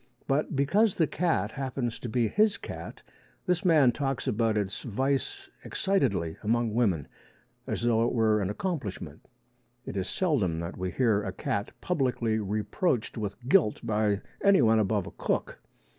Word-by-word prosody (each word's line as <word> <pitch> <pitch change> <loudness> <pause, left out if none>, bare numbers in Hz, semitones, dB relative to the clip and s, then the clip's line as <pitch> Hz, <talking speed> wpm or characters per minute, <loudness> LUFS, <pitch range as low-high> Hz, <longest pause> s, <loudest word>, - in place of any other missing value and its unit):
But 145 +2 0
because 190 +10 +3
the 165 - +3
cat 155 - 0
happens 130 -3 -3
to 120 - -5
be 115 0 +1
his 210 - +2
cat, - - -8 0.4
this 180 +1 +1
man 155 -8 +5
talks 135 +1 -2
about 110 0 +1
its 100 -2 -2
vice 135 +4 -2 0.2
excitedly 110 - 0
among 115 +1 0
women 100 - +1 0.6
as - - -2
though 115 -1 +3
it - - -1
were 110 -3 +2
an 95 - -1
accomplishment. 105 - -4 0.6
It - - -6
is 95 -2 -2
seldom 110 - 0
that 85 +2 -5
we 95 0 -3
hear 110 -2 +2
a 100 -2 -4
cat 100 +2 -2
publicly 125 -9 0
reproached 110 - -1
with 110 +2 -5
guilt 150 - +3
by 105 -2 +1 0.2
anyone 120 - +5
above 105 -2 +1
a - - -8
cook. - - -2
115 Hz, 155 wpm, -28 LUFS, 105-140 Hz, 0.6 s, man